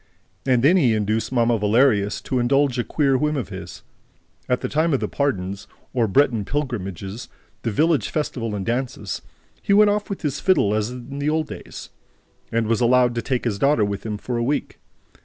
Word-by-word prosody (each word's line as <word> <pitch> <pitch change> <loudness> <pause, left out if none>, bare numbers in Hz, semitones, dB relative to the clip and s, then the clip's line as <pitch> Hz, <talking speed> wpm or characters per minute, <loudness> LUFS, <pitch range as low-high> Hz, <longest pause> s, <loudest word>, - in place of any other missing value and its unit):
And 125 -2 +3
then 170 +7 +6
he 125 -10 +3
induced 110 +2 -1
Mamma 120 -2 +2
Valerius 105 -1 +2
to 130 - -1
indulge 130 +1 +2
a - - +1
queer 140 -1 +1
whim 150 0 0
of 120 -11 -3
his. - - -9 0.7
At 125 - +1
the - - -2
time 155 0 +1
of - - 0
the - - -2
"pardons," 100 -8 -2 0.3
or 120 -3 +2
Breton 115 0 +2
pilgrimages, 100 - -4 0.3
the 115 - -1
village 155 +7 +2
festival 120 -8 -2
and 95 -2 -4
dances, 120 -5 -3 0.4
he 200 - +1
went 210 0 +6
off 210 0 -2
with 200 - -5
his 145 -2 -1
fiddle, 185 - +3
as 110 +1 0
in 125 +3 -8
the 145 +1 0
old 155 0 +1
days, - - -9 0.6
and 115 0 +1
was 115 +1 0
allowed 125 0 +4
to 120 - -2
take 125 +2 -2
his 105 -4 -1
daughter 140 -6 +3
with 100 -1 -4
him 105 -2 -3
for 120 +3 -4
a 120 - 0
week. 145 +5 -2
125 Hz, 195 wpm, -22 LUFS, 110-145 Hz, 0.7 s, then